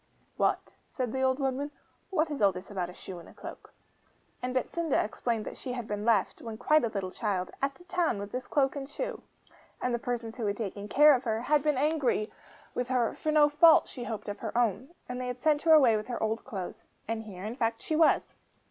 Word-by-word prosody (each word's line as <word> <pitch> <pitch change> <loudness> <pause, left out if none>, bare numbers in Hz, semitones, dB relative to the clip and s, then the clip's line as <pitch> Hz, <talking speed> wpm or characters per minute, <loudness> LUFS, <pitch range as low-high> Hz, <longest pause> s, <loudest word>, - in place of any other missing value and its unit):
'What,' - - 0 0.2
said 250 -4 -3
the 265 - -1
old 260 0 +3
woodman, 270 +1 -1 0.4
'what 325 -4 +1
is 285 - -3
all 200 -1 +6
this 185 +2 -9
about 180 -3 -2
a - - -9
shoe 185 -2 -8
and 170 - -13
a - - -17
cloak?' - - -10 0.7
And 250 - -2
Betsinda 320 +4 0
explained 225 +1 -1
that - - -7
she 250 - -5
had 240 -3 -5
been 210 0 -3
left, 220 -5 +2
when 225 -2 -6
quite 305 +5 +3
a - - +2
little 195 -3 -3
child, 190 -4 -2
at 275 0 0
the 350 - -16
town 355 - 0
with 200 0 -6
this 250 0 -4
cloak 270 -1 +2
and 275 -1 -5
this 290 - -13
shoe. - - -3 0.6
And 250 - -1
the 240 - 0
persons 235 -1 -4
who 225 -4 -1
had 200 0 -1
taken 205 -2 -4
care 295 +6 +7
of 255 -1 0
her 220 -1 0
had 295 +4 +3
had - - -13
been 300 -3 +2
angry 280 -7 +1 0.4
with 245 - -2
her, 250 -3 +1
for 310 - -2
no 300 -1 +6
fault, 310 +2 +6
she 245 -3 -7
hoped, 220 -3 -5
of 205 - -4
her - - -4
own. 235 +1 +1 0.2
And 250 0 -4
they 250 - -3
had 250 0 -4
sent 300 +1 +2
her 325 -1 +5
away 260 -8 +7
with 215 0 -3
her 240 -3 -3
old 220 +1 -1
clothes 195 -8 -6 0.2
and 225 0 -2
here, 195 -4 -9
in 220 +3 -4
fact, 230 -2 -1
she 315 - -1
was. 320 0 +3
245 Hz, 245 wpm, -29 LUFS, 215-285 Hz, 0.7 s, care